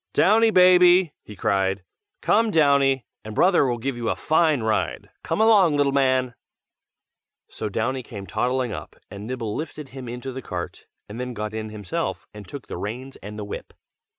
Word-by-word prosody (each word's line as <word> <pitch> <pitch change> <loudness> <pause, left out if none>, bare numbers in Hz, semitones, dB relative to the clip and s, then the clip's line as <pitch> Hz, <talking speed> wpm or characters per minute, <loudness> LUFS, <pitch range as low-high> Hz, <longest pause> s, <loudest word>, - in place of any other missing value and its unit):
"Downy, 225 +3 +5
baby!" 180 -3 +6
he 105 - -12
cried, 95 0 0 0.4
"Come, 225 +1 +3
Downy, 140 - +3 0.2
and 110 0 -8
brother 180 -6 +4
will 120 -1 -1
give 130 +3 -3
you 120 -1 -2
a - - 0
fine 155 -5 +2
ride! 110 -1 -1
come - - -2
along, 200 -9 +5
little 140 -1 +2
man!" 130 -2 +2 1.2
So 110 - -5
Downy 120 +6 -1
came 105 -5 -9
toddling 125 +2 -1
up, - - -8 0.2
and 100 +2 -8
Nibble 115 -4 -4
lifted 150 -2 -6
him 130 -3 -8
into 125 +2 -6
the 130 +1 -6
cart, 90 -6 -6 0.2
and 105 +3 -8
then 125 -1 -4
got 105 0 -4
in 110 0 -4
himself, 105 -4 -4
and 105 -2 -11
took 140 - -8
the - - -7
reins 125 +6 -6
and 105 +1 -9
the 105 - -5
whip. 100 - -8
130 Hz, 180 wpm, -24 LUFS, 110-150 Hz, 1.2 s, baby